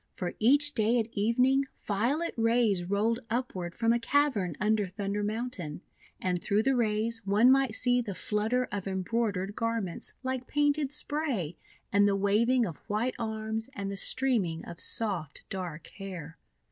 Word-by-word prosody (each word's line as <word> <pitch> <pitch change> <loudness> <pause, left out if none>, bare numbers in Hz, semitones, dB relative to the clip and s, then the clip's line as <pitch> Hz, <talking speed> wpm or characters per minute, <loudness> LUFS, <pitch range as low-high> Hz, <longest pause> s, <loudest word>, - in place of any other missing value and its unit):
For 180 -2 -3
each 285 +6 +5
day 225 +2 +2
at 225 -1 0
evening, 250 +6 +2 0.2
violet 250 +12 0
rays 230 -5 +2
rolled 210 +5 +1
up 245 +3 -1
ward 175 -2 -5
from 230 0 +2
a 235 - +1
cavern 230 - +1
under 210 0 +2
Thunder 200 +2 -3
Mountain; 205 -8 -4 0.4
and 180 -1 -1
through 205 +2 +1
the 270 +1 +2
rays 225 0 +1
one 210 +6 +5
might 270 -4 +3
see 245 0 +3
the 205 -5 -5
flutter 220 +6 0
of 200 -2 -3
embroidered 195 0 -1
garments 230 -6 -2
like 260 -1 -3
painted 290 -1 +1
spray, 290 - -1 0.4
and 205 0 +5
the 200 - +2
waving 225 +5 +3
of 165 -7 -5
white 220 +5 0
arms, 220 0 -3
and 200 -1 -4
the - - -4
streaming 195 -7 0
of 170 - -9
soft, 185 -10 -1
dark 175 -5 -5
hair. 175 -5 -7
220 Hz, 160 wpm, -29 LUFS, 195-245 Hz, 0.4 s, each